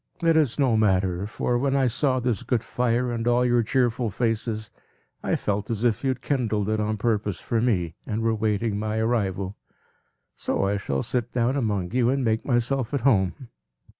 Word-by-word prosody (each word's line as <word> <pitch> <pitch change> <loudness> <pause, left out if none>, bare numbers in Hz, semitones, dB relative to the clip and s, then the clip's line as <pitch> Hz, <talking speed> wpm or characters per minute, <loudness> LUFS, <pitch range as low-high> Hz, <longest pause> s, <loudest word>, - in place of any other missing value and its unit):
It 165 -1 +4
is 150 -7 +2
no 130 -5 +3
matter; 95 -3 +1
for, 120 +2 -1
when 135 +1 +1
I 135 -1 +3
saw 130 +2 +1
this 120 -5 -1
good 125 -3 -1
fire, 125 0 0
and 115 0 -2
all 120 +1 +3
your 120 -1 +3
cheerful 120 0 +1
faces, 110 0 -2 0.5
I - - 0
felt 105 0 -2
as 115 -1 -2
if 120 0 +1
you - - 0
had 130 -1 -2
kindled 110 -7 0
it 110 0 0
on 105 0 -1
purpose 105 -3 -1
for 115 -2 -1
me, 90 -9 0
and 110 +1 -2
were 115 0 +2
waiting 105 -1 0
my 110 +1 -2
arrival. 100 -4 -1 0.8
So - - -1
I 100 +1 +1
shall 70 -9 -2
sit 120 -2 -2
down 125 +2 +1
among 105 -9 -1
you, 120 0 +2
and 135 0 +1
make 110 0 +1
myself 125 +1 0
at 140 - -1
home." 115 0 +1
115 Hz, 195 wpm, -25 LUFS, 105-125 Hz, 0.8 s, It